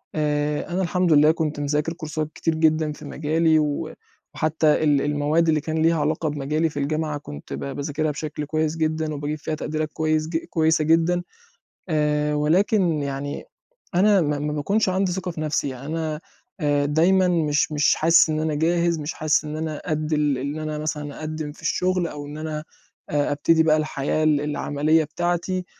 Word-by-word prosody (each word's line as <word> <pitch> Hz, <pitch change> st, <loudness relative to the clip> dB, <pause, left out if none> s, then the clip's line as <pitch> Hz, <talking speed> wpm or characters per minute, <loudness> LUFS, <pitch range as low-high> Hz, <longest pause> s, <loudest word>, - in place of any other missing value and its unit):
آآ، 150 Hz, -1 st, -1 dB
أنا 180 Hz, +2 st, -1 dB
الحمد 180 Hz, -2 st, +2 dB
لله، 150 Hz, +1 st, +6 dB
كنت 155 Hz, -2 st, -2 dB
مذاكر 150 Hz, +2 st, -1 dB
كورسات 155 Hz, -1 st, -4 dB
كتير 165 Hz, -1 st, -1 dB
جدًا 155 Hz, -1 st, +2 dB
في 150 Hz, -, -10 dB
مجالي، 160 Hz, +1 st, +2 dB
و 150 Hz, +1 st, -2 dB, 0.4 s
وحتى 155 Hz, 0 st, +1 dB, 0.2 s
ال 145 Hz, -2 st, +3 dB
المواد 150 Hz, +3 st, +1 dB
اللي 155 Hz, -2 st, +2 dB
كان 160 Hz, +2 st, -3 dB
ليها 165 Hz, 0 st, +3 dB
علاقة 155 Hz, +1 st, 0 dB
بمجالي 150 Hz, +3 st, -1 dB
في 145 Hz, -, -10 dB
الجامعة، 155 Hz, +1 st, -1 dB
كنت 75 Hz, -, -9 dB
ب 70 Hz, -, -4 dB
باذاكرها 145 Hz, -, -2 dB
بشكل 150 Hz, 0 st, -5 dB
كويس 155 Hz, +1 st, -1 dB
جدًا، 155 Hz, -1 st, -1 dB
وباجيب 145 Hz, +1 st, -3 dB
فيها 155 Hz, +1 st, -4 dB
تقديرات 155 Hz, 0 st, -3 dB
كويس 155 Hz, -1 st, 0 dB
ج 165 Hz, 0 st, -1 dB
كويسة 160 Hz, -1 st, +2 dB
جدًا. 165 Hz, +3 st, +2 dB, 0.7 s
آآ، 150 Hz, -1 st, +1 dB
ولكن 170 Hz, +2 st, +2 dB
يعني 140 Hz, +1 st, -4 dB, 0.5 s
أنا 200 Hz, +1 st, +5 dB
ما 145 Hz, -2 st, 0 dB
ما 150 Hz, +1 st, -2 dB
باكونش 195 Hz, +8 st, +1 dB
عندي 185 Hz, 0 st, +1 dB
ثقة 185 Hz, 0 st, -3 dB
في 160 Hz, -, -6 dB
نفسي، 150 Hz, -2 st, -1 dB
يعني 130 Hz, +1 st, -8 dB
أنا 155 Hz, 0 st, -3 dB, 0.4 s
آآ، 145 Hz, -2 st, +1 dB
دايمًا 175 Hz, +6 st, +3 dB
مش 155 Hz, -4 st, +1 dB
مش 150 Hz, -1 st, +3 dB
حاسِس 165 Hz, 0 st, +5 dB
إن 155 Hz, -, 0 dB
أنا 155 Hz, -1 st, -1 dB
جاهز، 170 Hz, +1 st, +1 dB
مش 150 Hz, +1 st, -4 dB
حاسِس 150 Hz, -1 st, +1 dB
إن 150 Hz, +1 st, -5 dB
أنا 155 Hz, -1 st, -4 dB
قد 155 Hz, -1 st, -1 dB
ال 150 Hz, -3 st, +1 dB
إن 140 Hz, +4 st, -4 dB
أنا 155 Hz, -1 st, -3 dB
مثلًا 150 Hz, -1 st, -4 dB
أقدِّم 155 Hz, -1 st, -4 dB
في 155 Hz, -, -16 dB
الشغل، 180 Hz, +2 st, 0 dB
أو 145 Hz, -2 st, -7 dB
إن 145 Hz, +1 st, -8 dB
أنا 155 Hz, -1 st, -4 dB, 0.5 s
آآ، 145 Hz, -1 st, 0 dB
أبتدي 160 Hz, +3 st, +3 dB
بقى 155 Hz, -1 st, +4 dB
الحياة 155 Hz, 0 st, -1 dB
ال 150 Hz, -2 st, +3 dB
العملية 150 Hz, +1 st, +1 dB
بتاعتي. 175 Hz, +4 st, -2 dB
155 Hz, 180 wpm, -23 LUFS, 150-160 Hz, 0.7 s, لله